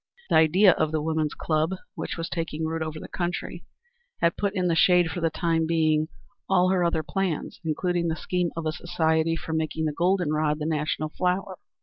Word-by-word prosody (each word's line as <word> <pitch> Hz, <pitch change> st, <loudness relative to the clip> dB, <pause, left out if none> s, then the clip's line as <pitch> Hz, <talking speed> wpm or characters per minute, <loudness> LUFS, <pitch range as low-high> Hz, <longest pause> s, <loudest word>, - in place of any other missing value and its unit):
The -, -, +4 dB
idea 180 Hz, +5 st, +6 dB
of 155 Hz, -, 0 dB
the 160 Hz, -, 0 dB
woman's 155 Hz, 0 st, -1 dB
club, 155 Hz, +3 st, 0 dB, 0.2 s
which -, -, -5 dB
was 165 Hz, 0 st, -3 dB
taking 160 Hz, -2 st, -3 dB
root 160 Hz, 0 st, -2 dB
over 155 Hz, -1 st, -4 dB
the -, -, -8 dB
country, 175 Hz, 0 st, -4 dB, 0.5 s
had 170 Hz, +1 st, +2 dB
put 200 Hz, 0 st, -1 dB
in 185 Hz, -2 st, +1 dB
the 170 Hz, -, +2 dB
shade 175 Hz, 0 st, +4 dB
for 175 Hz, -, -4 dB
the 165 Hz, -, +2 dB
time 165 Hz, 0 st, 0 dB
being 155 Hz, -2 st, +2 dB, 0.4 s
all 185 Hz, -1 st, +4 dB
her 185 Hz, -1 st, +2 dB
other 170 Hz, -2 st, +1 dB
plans, 195 Hz, -5 st, -2 dB
including 170 Hz, +2 st, 0 dB
the 160 Hz, -, 0 dB
scheme 180 Hz, 0 st, -1 dB
of 165 Hz, -, -3 dB
a 155 Hz, -, +1 dB
society 165 Hz, -1 st, 0 dB
for 160 Hz, 0 st, -5 dB
making 160 Hz, 0 st, -1 dB
the 150 Hz, -, -1 dB
golden 175 Hz, -1 st, +1 dB
rod 150 Hz, -1 st, +1 dB
the 150 Hz, -, -4 dB
national 155 Hz, 0 st, -1 dB
flower. 185 Hz, +3 st, -2 dB
165 Hz, 205 wpm, -26 LUFS, 155-180 Hz, 0.5 s, idea